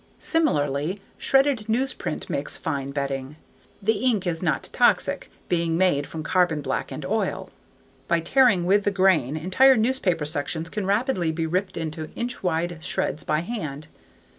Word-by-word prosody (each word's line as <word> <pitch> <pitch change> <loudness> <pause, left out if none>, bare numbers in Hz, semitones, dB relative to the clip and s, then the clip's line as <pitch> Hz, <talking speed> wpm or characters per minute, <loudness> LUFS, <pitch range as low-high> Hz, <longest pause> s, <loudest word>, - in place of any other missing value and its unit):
Similarly, 155 - 0 0.2
shredded 270 -5 +2
newsprint 255 +4 -2
makes - - -3
fine 140 -5 -3
bedding. 140 0 -3 0.5
The 220 +1 +1
ink 220 -7 +2
is 165 -2 -1
not 170 -4 0
toxic, - - +2 0.2
being 170 -2 0
made 170 -6 +2
from 160 -1 -6
carbon 175 -3 +2
black - - -2
and - - -6
oil. - - -2 0.6
By 170 - +2
tearing 230 -3 +4
with 200 +3 +3
the 205 - +2
grain, 185 -8 +2
entire 240 - +5
newspaper 215 - +1
sections 160 +2 -3
can 210 -3 -3
rapidly 200 - +1
be 165 0 -2
ripped 185 +3 -1
into 155 -1 -4
inch 240 +1 -4
wide 170 -2 -1
shreds 155 - -2
by 155 - 0
hand. 155 -8 -5
175 Hz, 150 wpm, -24 LUFS, 155-210 Hz, 0.6 s, entire